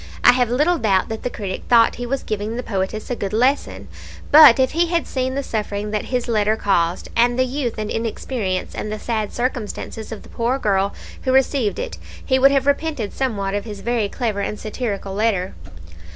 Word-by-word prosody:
I - - +9
have 245 -2 +1
little 305 +8 +2
doubt 195 -2 +2
that 220 0 -4
the 250 - -2
critic 195 -5 -5
thought 230 -1 +5
he 245 0 -4
was 275 +2 -2
giving 215 +2 -3
the 250 - -3
poetess 200 +2 -3
a - - 0
good 200 -3 -4
lesson; 255 +6 0 0.4
but 300 -5 +9
if 260 -1 +3
he 340 +2 +2
had 335 -1 0
seen 260 0 -2
the 280 - -1
suffering 210 -3 -3
that 210 -1 -2
his 250 -1 -2
letter 215 -2 +2
caused, 180 -5 0
and 240 +1 +3
the 255 - +3
youth 255 -3 -3
and 215 -1 -3
inexperience, 225 -4 -3
and 210 - -4
the 215 - -3
sad 215 -1 -2
circumstances 235 -3 -4
of 220 - -7
the - - -15
poor 235 +3 -1
girl 200 -4 0 0.3
who 260 - 0
received 265 -4 +2
it, - - -5 0.3
he 260 -1 +2
would 275 +1 +7
have 275 -1 +1
repented 285 -6 -1
somewhat 205 -7 -2
of 205 +1 -2
his 205 -3 -7
very 235 -3 0
clever 220 -4 -2
and 210 +1 -3
satirical 210 -3 -4
letter. 200 -3 0
230 Hz, 205 wpm, -21 LUFS, 205-260 Hz, 0.4 s, I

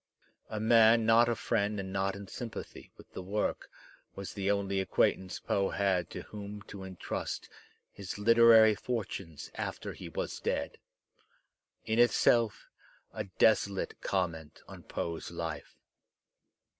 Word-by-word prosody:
A 110 - -4
man 115 0 +5
not 115 +1 +5
a 120 - +1
friend 105 -2 -1
and 95 -1 -5
not 95 0 0
in 100 0 -9
sympathy 115 +3 -8
with - - -16
the - - -5
work 100 +3 -2 0.5
was 100 -1 -6
the 100 -1 -2
only 100 -1 0
acquaintance 95 0 0
Poe 100 -1 0
had 95 -4 0
to - - -7
whom 105 -1 -8
to 100 -2 -9
entrust 95 -2 -5 0.4
his 100 -1 -7
literary 115 0 +7
fortunes 100 - -5
after - - -5
he - - -9
was - - -4
dead - - -2 0.5
— - - -43
in 110 +1 0
itself 120 -2 +3 0.5
a 110 -1 -4
desolate 100 0 +1
comiment 80 -5 -3
on - - -11
Poe's 85 -1 -5
life. 80 -3 -6
100 Hz, 135 wpm, -31 LUFS, 95-110 Hz, 0.5 s, literary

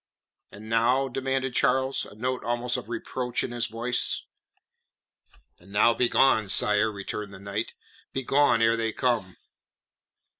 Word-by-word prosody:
"And 105 +2 -11
now?" 120 +4 +2
demanded 135 0 -2
Charles, 130 +1 +1
a - - -13
note 125 +2 -2
almost 120 +2 -1
of 110 - -5
reproach 125 +1 -3
in - - -4
his 120 -1 -2
voice. 120 +2 0 1.4
"And 90 +3 -18
now 105 +3 +4
begone, 120 -2 +3
sire," 105 +2 +2
returned 100 0 -6
the - - -11
knight. 100 +3 -4 0.4
"Begone 135 -2 +2
ere 115 0 +4
they 115 -1 -2
come." 115 -8 -1
115 Hz, 135 wpm, -26 LUFS, 105-125 Hz, 1.4 s, now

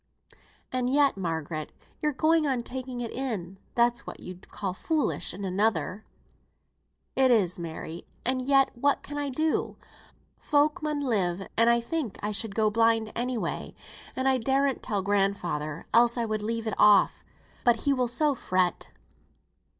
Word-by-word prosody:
"And 255 -1 0
yet, 280 +1 +3
Margaret, 160 -4 -4 0.3
you're 300 - +1
going 310 +2 +2
on 255 -3 0
taking 255 0 -5
it 235 - -4
in; 195 -8 -4 0.2
that's 240 0 +2
what - - -7
you'd 180 0 -10
call 195 -3 -4
foolish 310 - -1
in 195 +2 -6
another." 190 0 0 1.1
"It 265 -1 +4
is, 195 -8 +3
Mary! 165 0 -7 0.2
and 255 +1 +1
yet 270 +1 +3
what 280 +4 +1
can 290 0 -5
I 285 -1 -2
do? 310 +4 -1 0.6
Folk 295 0 +2
mun 300 -1 -1
live; 195 -8 0
and 230 +1 +4
I 235 0 +4
think 240 -3 -3
I 210 - -1
should 205 0 -2
go 215 -1 +2
blind 225 0 +2
any 250 +1 -1
way, - - -4 0.4
and 260 +1 0
I 260 -1 +3
darn't 270 +2 +1
tell 205 -3 -2
grandfather, 180 -7 -1
else 235 +1 +5
I 235 - 0
would 215 -1 -2
leave 225 +1 -3
it 220 - -2
off, 210 -2 +5 0.4
but 235 -2 +3
he 280 - +2
will 255 -2 +1
so 290 +5 +2
fret." 185 -7 0
230 Hz, 160 wpm, -27 LUFS, 195-265 Hz, 1.1 s, else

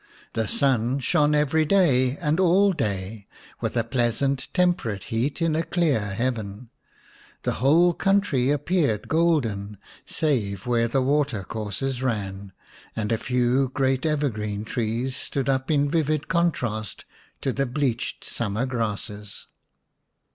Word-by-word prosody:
The 110 -1 -1
sun 130 -1 +1
shone 150 +3 +2
every 150 +2 +2
day 145 -7 +3
and 155 0 0
all 190 +2 +4
day, 100 - -3 0.3
with - - -2
a 115 - +3
pleasant 125 +3 0
temperate 175 - +1
heat 135 +8 0
in 165 -2 +1
a 160 - +2
clear 165 -7 +1
heaven. 110 +1 -3 0.7
The - - 0
whole 165 +6 +5
country 195 -10 +2
appeared 145 - +1
golden, 120 -12 +1 0.3
save 110 - -1
where 120 -1 +2
the 130 +3 +1
water 140 -6 +1
courses 110 +6 -4
ran, 100 -6 -3 0.4
and 110 -1 -2
a 115 - +2
few 125 +1 +1
great 135 -1 +1
evergreen 110 -9 -1
trees 120 +3 -2
stood 135 -1 -3
up 130 -1 0
in 145 -2 +3
vivid 155 -1 0
contrast 125 - -1 0.4
to 135 - -1
the 140 -1 0
bleached 125 -2 -2
summer 110 +2 -2
grasses. 105 -4 -4
130 Hz, 130 wpm, -25 LUFS, 110-150 Hz, 0.7 s, whole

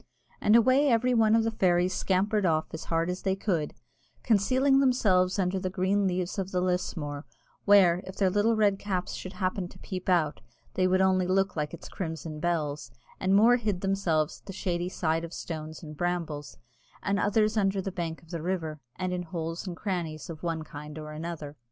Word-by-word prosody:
And 210 - +5
away 260 +5 +5
every 250 +1 +3
one 220 -2 +4
of 225 - +3
the 225 - 0
fairies 180 -3 +2
scampered 200 +3 +1
off 160 -3 +2
as 160 - -6
hard 165 0 0
as 180 - -5
they 190 -1 0
could, 175 -7 -1 0.5
concealing 260 +6 +3
themselves 205 -9 +3
under 190 0 0
the 185 - -2
green 190 +2 +1
leaves 180 +2 -2
of 190 -1 -2
the 185 - 0
lusmore, 170 -5 -2 0.4
where, 185 -4 +6
if 190 - -7
their 190 -2 +2
little 210 +4 +3
red 205 -2 +2
caps 185 -3 -2
should 185 - -6
happen 185 -1 -2
to - - -15
peep 185 -1 -5
out, 165 -5 +2 0.3
they 185 0 +2
would 185 +1 +3
only 185 -1 +3
look 195 +1 +1
like 150 -2 -2
its - - -9
crimson 160 -3 -5
bells; 150 -6 -1 0.3
and 190 +1 +2
more 230 +4 +6
hid 210 -6 -2
themselves 180 -6 0
at - - -37
the 195 - -6
shady 175 -1 -2
side 165 -2 -1
of 170 0 -7
stones 155 -1 -6
and 150 -1 -9
brambles, 165 -4 -3 0.5
and 200 0 +1
others 215 +1 +2
under 195 -2 +1
the 190 +1 -3
bank 170 -3 -4
of 165 - -17
the 170 -2 -4
river, 160 -3 -3 0.2
and 185 0 -2
in 180 - -2
holes 165 0 -5
and 175 -2 -5
crannies 170 -6 -3
of 160 -1 -9
one 165 -2 -2
kind 150 0 -9
or 155 0 -7
another. 155 -2 -6
185 Hz, 200 wpm, -28 LUFS, 165-200 Hz, 0.5 s, where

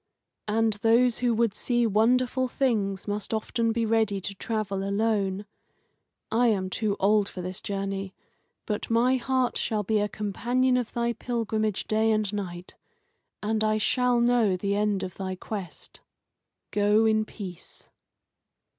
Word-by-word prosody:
And 220 +1 +2
those 235 +1 +4
who 245 -1 +2
would 230 -2 +2
see 240 +2 0
wonderful 250 +4 +2
things 215 -8 -1
must 205 +1 -2
often 230 +1 0
be 230 0 0
ready 220 -3 +1
to 200 +2 -4
travel 200 -1 -3
alone. 200 -1 0 0.9
I 240 +2 +3
am 190 -4 0
too 210 -1 -1
old 205 +1 +3
for 180 - -7
this 185 +1 -5
journey, 195 -1 -4 0.5
but 210 -1 -3
my 240 +3 +3
heart 255 0 0
shall 215 -2 -1
be 215 +2 +1
a 205 0 0
companion 245 +6 0
of 245 -3 -1
thy 235 0 0
pilgrimage 220 -3 -2
day 220 +1 +2
and 215 -2 0
night, 180 -3 -5 0.7
and 215 +1 0
I 215 0 +2
shall 250 +2 +2
know 235 -5 +3
the 200 +2 -1
end 205 -1 0
of 185 - -6
thy 190 -1 -3
quest. 190 -1 -8 0.7
Go 210 +2 +3
in 220 0 +3
peace." 190 -5 -10
215 Hz, 145 wpm, -27 LUFS, 200-235 Hz, 0.9 s, those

